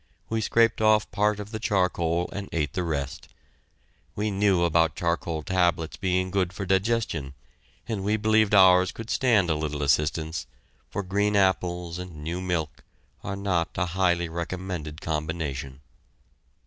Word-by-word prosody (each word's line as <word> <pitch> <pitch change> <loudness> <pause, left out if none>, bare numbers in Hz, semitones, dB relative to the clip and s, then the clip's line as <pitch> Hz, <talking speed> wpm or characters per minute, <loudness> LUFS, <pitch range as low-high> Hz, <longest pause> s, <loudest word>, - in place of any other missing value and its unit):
We 115 0 0
scraped 115 +1 +2
off 110 0 +3
part 105 0 +1
of 105 +1 -7
the 110 - -4
charcoal 90 -6 +1
and 100 0 -5
ate 75 -3 -1
the 90 - -1
rest. 70 -5 -3 0.9
We 105 +1 -1
knew 95 -3 +2
about 80 -2 +2
charcoal 85 0 -2
tablets 90 -3 +1
being 95 -1 0
good 95 -2 0
for 100 +1 -5
digestion, 95 -8 0 0.5
and 110 -4 -3
we 105 +2 +1
believed 110 -1 +3
ours 90 -1 +6
could 115 0 -7
stand 110 -10 +3
a - - +2
little 75 -1 -3
assistance, 80 +3 0 0.4
for 100 - -3
green 100 +2 0
apples 90 -3 +1
and 90 -5 -8
new 85 +3 -3
milk 85 -5 -3 0.4
are 95 - -3
not 95 -4 -1
a 90 - +1
highly 85 -2 +2
recommended 85 -2 -5
combination. 75 -4 -4
90 Hz, 150 wpm, -26 LUFS, 80-100 Hz, 0.9 s, ours